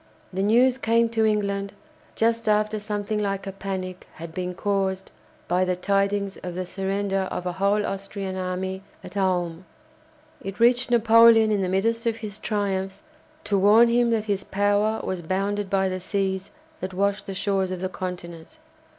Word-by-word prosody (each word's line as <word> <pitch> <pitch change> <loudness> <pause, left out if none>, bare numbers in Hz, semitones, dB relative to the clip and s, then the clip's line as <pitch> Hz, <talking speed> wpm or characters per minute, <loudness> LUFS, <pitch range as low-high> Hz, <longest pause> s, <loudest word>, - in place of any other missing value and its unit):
The 190 - -1
news 245 +5 +4
came 230 -1 +2
to 225 -1 +1
England, 200 -2 -1 0.4
just 230 0 +1
after 215 0 +2
something 210 0 -3
like 195 -1 -2
a 195 - -4
panic 190 -1 -5
had 160 0 -9
been 180 +1 -4
caused 195 -1 -1 0.4
by 180 +1 +2
the 185 0 0
tidings 200 +1 0
of 180 -1 -7
the 185 0 -3
surrender 195 0 -1
of 180 - -4
a 180 - -1
whole 200 +3 +1
Austrian 195 -1 -4
army 185 +1 -3 0.2
at - - -10
Ulm. 180 -3 0 0.8
It 195 +2 -7
reached 245 +2 +4
Napoleon 230 -1 +6
in 205 -2 +1
the 185 - -1
midst 230 +5 0
of 230 - +1
his 215 -2 -7
triumphs, 195 -2 -2 0.4
to 200 -2 +1
warn 215 +4 +6
him 240 0 +3
that 225 -2 +1
his 200 -2 -1
power 205 +2 +1
was 185 -2 -3
bounded 195 +3 -1
by 195 0 +2
the 185 0 -3
seas 190 0 -2 0.3
that 185 0 -5
washed 200 +1 0
the 195 - -5
shores 195 -1 0
of 185 -1 -4
the 185 - -2
Continent. 175 -3 -7
195 Hz, 170 wpm, -24 LUFS, 190-210 Hz, 0.8 s, Napoleon